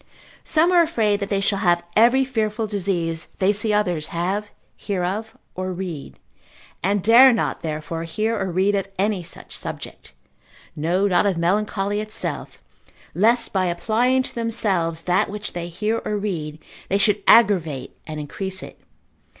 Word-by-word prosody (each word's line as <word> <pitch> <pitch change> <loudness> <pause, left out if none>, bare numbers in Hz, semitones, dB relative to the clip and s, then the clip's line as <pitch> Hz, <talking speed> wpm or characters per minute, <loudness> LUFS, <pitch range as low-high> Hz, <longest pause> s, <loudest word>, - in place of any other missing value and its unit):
Some 330 +3 +3
are 350 -1 +6
afraid 220 -11 +1
that 200 - -4
they 195 -1 0
shall 200 0 0
have 175 -3 +2
every 245 +5 +5
fearful 220 -3 -1
disease 180 -5 -2
they 195 +2 +3
see 210 +1 -1
others 180 -7 +1
have, 190 +5 -2 0.3
hear 195 -4 -3
of, 210 +5 -3 0.2
or 185 0 -4
read, 180 -5 -6 0.6
and 200 +1 0
dare 240 +5 +8
not 230 - -1
therefore 160 +1 -4
hear 215 +7 -1
or 190 -2 -2
read 190 +4 +2
of 195 -1 -1
any 200 0 0
such 165 - -8
subject, - - -7 0.6
no 175 +6 +1
not 190 +1 +3
of 190 -4 0
melancholy 200 +3 0
itself, 215 0 -5 0.5
lest 230 +4 +2
by 185 -2 +1
applying 235 +9 +1
to - - -6
themselves 195 -8 -1
that 180 +4 +1
which 210 0 -5
they 175 -1 -4
hear 210 +6 -2
or 210 - -2
read, 165 -7 -4 0.3
they 195 - +2
should 205 +1 +2
aggravate 165 - +4
and 155 -1 -5
increase 190 +6 -5
it. - - -12
200 Hz, 160 wpm, -22 LUFS, 175-215 Hz, 0.6 s, dare